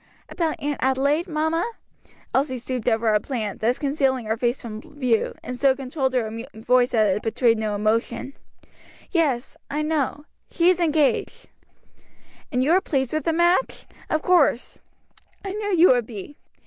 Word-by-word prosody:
"About 330 -3 -2
Aunt 290 0 -3
Adelaide, 280 +5 +1
mamma?" 325 +7 -1 0.6
Elsie 265 -1 +1
stooped 250 0 -2
over 225 0 +1
a 210 -1 +3
plant, 215 -4 -4
thus 235 +3 +1
concealing 275 -4 0
her 220 +1 0
face 240 +2 -1
from 220 -3 -7
view, 255 -6 -1
and 250 - -5
so 265 +1 +3
controlled 265 0 -2
her 225 -1 -2
voice 245 +3 +2
that 215 -5 +2
it - - -6
betrayed 225 0 +2
no 215 -1 -1
emotion. 230 +5 -1 0.8
"Yet; 280 -8 0
I 300 +2 -1
know; 300 -1 -1 0.2
she 340 +1 +3
is 365 -1 +2
engaged." 310 -4 0 1.0
"And 250 0 +1
you 290 - +2
are 370 +2 +5
pleased 265 -8 -1
with 310 - -1
the 330 - +2
match, 345 +7 +1 0.2
of 310 - 0
course; 310 -9 +2 0.7
I 390 - -3
knew 410 -3 -1
you 345 +3 +7
would 245 -3 +3
be. 225 +5 -8
265 Hz, 160 wpm, -23 LUFS, 235-310 Hz, 1.0 s, you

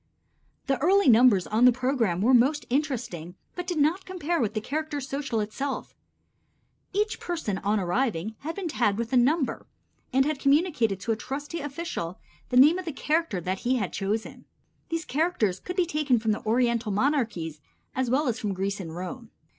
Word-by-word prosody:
The 270 -2 0
early 385 +3 +4
numbers 225 -5 +6
on 225 +3 +3
the 250 - +8
program 245 -8 0
were 245 +5 +4
most 270 +5 +4
interesting, 240 - -2 0.2
but 360 0 -5
did 355 - -2
not 315 +6 +2
compare 345 -3 -2
with 220 -1 -1
the - - +1
character 300 +5 -3
social 275 -3 -3
itself. 265 +7 -4 1.0
Each 420 +2 -1
person 320 - -3
on 205 +1 +1
arriving 210 +1 -1
had 320 +3 -5
been 390 -3 -3
tagged 210 -9 +1
with 235 +2 -3
a - - +4
number 270 +4 +2 0.4
and 265 +1 +3
had 305 -2 -1
communicated 275 - +2
to 225 - -1
a - - +2
trusty 290 +8 -5
official 285 - -5 0.3
the 250 - +1
name 300 +8 +7
of 370 - -6
the 325 - -3
character 305 - 0
that 185 +2 -2
he 255 +2 +1
had 205 -7 -2
chosen. 210 +3 -3 0.4
These 330 -1 -2
characters 265 - 0
could 360 - -6
be 365 -2 +2
taken 300 -6 +1
from 220 -1 0
the 210 - -2
Oriental 235 -1 +1
monarchies 210 - 0 0.3
as 260 -2 0
well 275 +4 +2
as 235 - -1
from 200 -3 -2
Greece 195 +2 -2
and 165 -4 -7
Rome. 220 +6 -6
255 Hz, 185 wpm, -27 LUFS, 215-305 Hz, 1.0 s, the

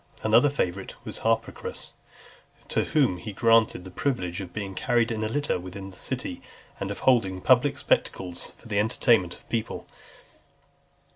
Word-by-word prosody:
Another 115 +6 +5
favourite 95 -9 -2
was - - -5
Harpocras, 115 0 -2 0.8
to - - +1
whom 135 - +2
he 105 +5 -6
granted 115 -3 +3
the 95 - -9
privilege 90 -6 -2
of 95 - -7
being 100 -2 -5
carried 120 +3 +1
in 110 -1 -2
a 110 - -1
litter 145 -6 0
within 95 +2 -8
the - - -15
city, - - -4 0.4
and 100 - -3
of 100 - -5
holding 100 -8 +3
public 130 +7 +4
spectacles 90 -9 -1
for - - -15
the 105 -2 0
entertainment 110 -4 +3
of - - -18
the - - -27
people. 115 -2 -2
110 Hz, 160 wpm, -26 LUFS, 95-120 Hz, 0.8 s, Another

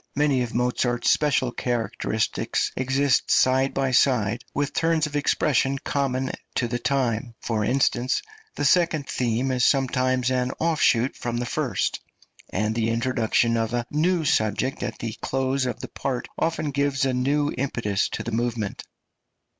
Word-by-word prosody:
Many 145 -3 +2
of 120 -2 -4
Mozart's 120 0 +1
special 140 -4 +2
characteristics 115 -2 -1
exist 135 +1 +1
side 130 +1 +3
by 135 -1 +1
side 120 -3 +2
with 145 0 -2
turns 165 -1 +2
of 150 -1 -6
expression 140 -1 +1
common 135 -1 -1 0.2
to 120 - +1
the 120 +1 -2
time; 120 -3 -1
for 110 -2 -1
instance, 125 +1 +1 0.3
the - - -1
second 165 -2 +3
theme 125 +2 0
is 125 -1 0
sometimes 130 -2 +2
an 125 0 0
offshoot 145 -6 +2
from 120 -1 -3
the 120 - -2
first, - - -1 0.5
and 105 +3 -1
the 115 0 0
introduction 115 -1 +1
of 115 +1 -1
a 120 -1 -1
new 165 +2 +1
subject 110 +2 0
at - - -4
the 115 -2 -4
close 135 0 0
of - - -4
the - - -5
part 130 -3 -3
often 160 -2 -1
gives 140 0 +1
a 130 - +1
new 145 +4 +1
impetus 115 -6 -1
to - - -4
the 115 - -4
movement. 115 -3 -2
130 Hz, 155 wpm, -24 LUFS, 120-140 Hz, 0.5 s, side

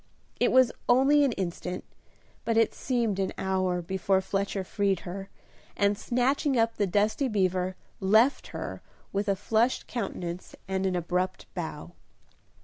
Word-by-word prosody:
It - - +3
was 255 -1 +5 0.2
only 270 +4 +5
an 275 - +3
instant, 180 -1 -4 0.6
but 230 -1 0
it 225 - +4
seemed 235 -6 -1
an 190 -1 -1
hour 185 -2 0
before 190 +2 +1
Fletcher 195 0 -2
freed 195 -1 0
her, 195 +2 -7 0.5
and 200 0 +3
snatching 255 +5 +1
up 230 0 +2
the 205 - +1
dusty 210 +8 +1
beaver, 185 -4 0 0.2
left 220 +8 +3
her - - -6 0.3
with 200 +1 -1
a 200 - +3
flushed 220 +5 +1
countenance 180 -6 -5
and 190 0 0
an 185 - 0
abrupt 180 +2 -1
bow. 160 -3 -5
195 Hz, 140 wpm, -28 LUFS, 185-230 Hz, 0.6 s, was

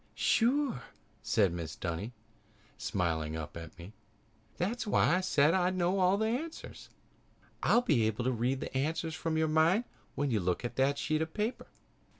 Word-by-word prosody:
"Sure!" 250 - +2 0.4
said 100 -5 +2
Mrs. 80 -2 -6
Dunny, 85 +6 -3 0.6
smiling 85 -7 -2
up 80 -2 -6
at 85 0 -9
me. 85 +5 -11 0.6
"That's 220 +6 -2
why 180 -3 +3
I - - 0
said 155 -4 +3
that 190 - +3
I'd 180 +1 +1
know 185 +1 +2
the 220 - 0
answers. 275 +9 -5 0.7
I'll 240 - +4
be 120 - +3
able 110 +2 -2
to 130 - +1
read 125 +3 -1
the - - -6
answers 160 +4 -1
from 160 0 -2
your 160 0 +2
mind 160 +8 +3 0.3
when 145 -1 0
you 110 - +2
look 90 +5 -1
at 120 - -4
that 135 +2 +2
sheet 155 +2 0
of 160 0 -4
paper." 220 +3 -2
150 Hz, 170 wpm, -31 LUFS, -, 0.7 s, I'll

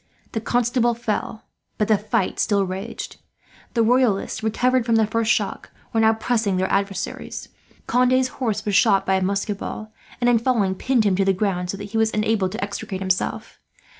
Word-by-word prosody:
The 225 - -3
Constable 240 0 +1
fell, 220 -1 -3 0.3
but 210 - +1
the 220 - +5
fight 205 -2 -1
still 200 -2 +2
raged. 185 +1 -6 0.6
The 230 - +4
Royalists, 225 -3 +2
recovered 250 +3 +1
from 230 -1 +1
the 220 -1 +4
first 225 +1 0
shock, - - -1 0.2
were 225 - +2
now 220 0 +5
pressing 220 -4 0
their 190 +1 0
adversaries. 195 0 -3 0.4
Conde's 255 +2 +3
horse 215 -3 -1
was 205 - -1
shot 195 -2 +4
by 190 - +1
a 190 - +2
musket 200 +2 -1
ball 215 0 -6 0.3
and, 240 - +1
in 240 -2 +4
falling, 225 -6 +1
pinned 245 +4 +1
him 200 -3 +2
to 195 - +3
the 195 - +3
ground 180 -2 -1
so 195 - -3
that 205 0 -8
he 225 - 0
was 220 -1 +1
unable 215 -3 +1
to 210 +2 -4
extricate 200 -1 -4
himself. 190 -1 -2
215 Hz, 190 wpm, -22 LUFS, 195-230 Hz, 0.6 s, the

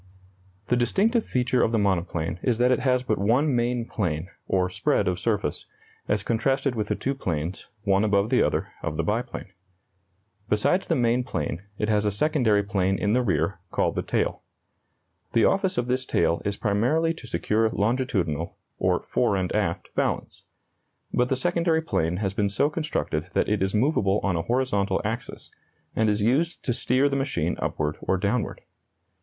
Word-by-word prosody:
The 125 - +4
distinctive 200 - +2
feature 125 0 +1
of 110 - +2
the 115 - +2
monoplane 85 -4 0
is 120 -3 +1
that 125 +1 +3
it 125 - +3
has 125 -1 +2
but 110 -5 0
one 125 +8 +2
main 120 0 0
plane, 90 -6 -2 0.2
or 90 -1 +2
spread 90 +1 0
of 90 -1 0
surface, 105 -9 -1 0.4
as 105 -1 0
contrasted 135 +4 +1
with 105 -3 -2
the - - 0
two 135 - -2
planes, 85 - -4
one 100 -1 +3
above 100 0 +2
the - - +4
other, - - 0
of - - -3
the - - 0
biplane. - - -3 1.0
Besides 105 - +2
the - - +2
main 120 0 +2
plane, 80 - -3 0.2
it 105 - -1
has 105 -1 +2
a 105 - +2
secondary 110 -4 +2
plane 95 -1 0
in 105 +1 +1
the 125 - +3
rear, 85 -4 0
called - - 0
the - - -1
tail. - - -1 0.9
The 115 - +4
office 195 -1 +1
of 120 - +1
this 130 +1 0
tail 85 0 +1
is 100 0 -2
primarily 125 +11 +1
to 145 -7 -11
secure 110 0 +1
longitudinal, 100 - -1 0.2
or - - +1
fore 100 - +1
and 95 -2 -1
aft, 95 -5 -1
balance; - - -2 0.7
but 125 0 +2
the 130 - +2
secondary 165 +2 +1
plane 90 - 0
has 95 -1 -1
been 100 0 +1
so 140 +9 +1
constructed 150 - -2
that - - +1
it 105 -2 0
is 95 +2 0
movable 105 -5 +2
on 100 -3 +1
a 85 - 0
horizontal 105 -4 0
axis, 115 +4 -5 0.4
and 110 -1 +2
is 105 0 +1
used 145 +10 +1
to 125 - +1
steer 130 +4 +2
the 140 - -1
machine 90 - -1
upward 75 0 -2
or 95 - +1
downward. 105 +5 -1
110 Hz, 180 wpm, -25 LUFS, 95-125 Hz, 1.0 s, The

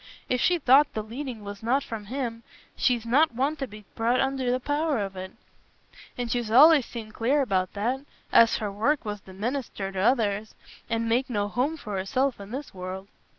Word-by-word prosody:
If 250 -1 0
she 360 - +3
thought 280 -1 +5
the 215 - -2
leading 235 0 -6
was 200 0 -8
not 255 +5 +1
from 220 -2 -6
Him, 235 -1 -4 0.3
she's 240 -3 +1
not 265 +3 +3
one 275 +5 +1
to 270 - -3
be 210 -1 -12
brought 235 +3 +1
under 265 -2 0
the 250 +1 +1
power 290 +2 0
of 195 -2 -3
it. 185 0 -6 0.9
And 240 -2 -3
she's 240 -3 -1
allays 285 +3 +7
seemed 220 -3 -8
clear 270 +6 +2
about 185 -6 0
that—as 230 +1 +2
her 210 -2 -3
work 230 +8 0
was 205 -1 -4
to 190 - -13
minister 215 -2 -3
t' 190 - -4
others, 215 -1 +1 0.3
and 230 0 0
make 245 +4 +1
no 205 -4 0
home 265 +9 -1
for 210 -8 -5
herself 250 +6 0
i' - - -7
this 265 +8 -7
world." 190 +1 -7
235 Hz, 195 wpm, -26 LUFS, 205-270 Hz, 0.9 s, allays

